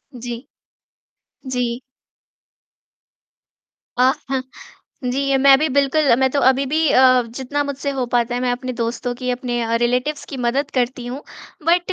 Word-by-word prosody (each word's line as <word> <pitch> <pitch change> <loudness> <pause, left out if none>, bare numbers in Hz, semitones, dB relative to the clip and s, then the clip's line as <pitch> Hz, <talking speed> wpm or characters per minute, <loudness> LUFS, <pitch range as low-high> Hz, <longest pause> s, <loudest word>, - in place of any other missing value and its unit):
जी। 240 0 -5 1.2
जी। 245 -1 -1 2.2
जी, 260 0 0 0.8
मैं 270 0 +6
भी 310 - +1
बिल्कुल 280 0 +3
मैं 265 0 +3
तो 280 - 0
अभी 265 +1 +4
भी 310 +3 +1
अ, 255 -1 +6
जितना 260 +5 -3
मुझसे 280 0 -3
हो 250 - 0
पाता 240 0 +1
है 245 - -1
मैं 250 - 0
अपने 255 +1 -4
दोस्तों 240 +1 -2
की 250 +1 -3
अपने 240 -2 -1
रिलेटिव्स 250 +5 0
की 275 - -5
मदद 260 +3 -1
करती 250 -1 -1
हूँ 260 +4 -6 0.4
बट 350 +2 +2
255 Hz, 135 wpm, -20 LUFS, 245-275 Hz, 2.2 s, मैं